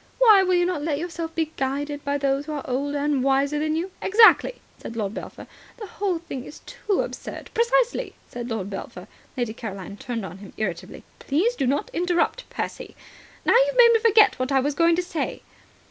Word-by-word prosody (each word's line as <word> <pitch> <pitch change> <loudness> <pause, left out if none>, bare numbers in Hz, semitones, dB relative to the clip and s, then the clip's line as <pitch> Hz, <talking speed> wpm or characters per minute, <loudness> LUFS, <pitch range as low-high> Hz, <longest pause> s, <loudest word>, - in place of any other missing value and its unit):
Why 440 -6 +7
will 370 -1 +2
you 350 0 +3
not 355 -4 -1
let 295 -1 -1
yourself 330 0 -5
be 320 -1 -1
guided 285 +2 -2
by 285 0 -1
those 275 +1 -1
who 310 - -4
are 290 - -5
older 280 +3 -1
and 285 -2 0
wiser 275 +2 +2
than 310 +1 0
you?" 350 +4 -3
"Exactly," 445 +4 +5 0.2
said 230 - -8
Lord 210 -3 -2
Belpher. - - -8 0.3
"The 435 - -7
whole 390 -2 -2
thing 325 -6 -7
is 295 - -12
too 410 -2 -1
absurd." - - -7
"Precisely," 475 +1 +1
said 240 0 -7
Lord 220 -4 -3
Belpher. 195 - -7 0.3
Lady 240 -3 -1
Caroline 200 -3 -7
turned 230 -3 -4
on 180 +1 -9
him 200 -1 -12
irritably. 185 -6 -4 0.2
"Please 375 - 0
do 270 - -1
not 280 +3 -1
interrupt, 355 +7 0
Percy. - - -6 0.5
Now, - - +4
you've - - +3
made 475 -1 +8
me 455 - +4
forget 430 - +5
what 255 +2 -1
I 270 - +4
was 285 +3 0
going 335 +3 +3
to 360 - -1
say." 335 -2 -4
295 Hz, 200 wpm, -24 LUFS, 260-365 Hz, 0.5 s, made